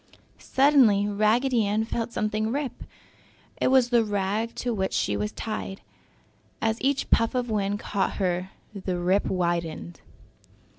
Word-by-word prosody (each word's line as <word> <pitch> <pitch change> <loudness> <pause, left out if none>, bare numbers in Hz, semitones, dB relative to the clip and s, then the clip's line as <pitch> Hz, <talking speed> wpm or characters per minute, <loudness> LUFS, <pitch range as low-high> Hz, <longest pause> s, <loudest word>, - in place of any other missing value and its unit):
Suddenly 260 -8 +4
Raggedy 220 +4 +2
Ann 215 +2 0
felt 230 0 -3
something 215 0 -1
rip. 280 0 -4 0.7
It - - +1
was 255 -2 +4
the 240 -2 +4
rag 205 +2 -2
to 245 -1 -2
which 190 -3 -2
she - - 0
was 210 0 -2
tied. 215 -4 -5 0.8
As 225 +1 -1
each 275 +1 0
puff 230 +2 +3
of 245 -2 -1
wind 205 -1 0
caught 200 -2 -1
her 185 -1 -1 0.2
the 185 -3 -3
rip 185 +3 +1
widened. 170 -2 -2
215 Hz, 140 wpm, -26 LUFS, 195-235 Hz, 0.8 s, Suddenly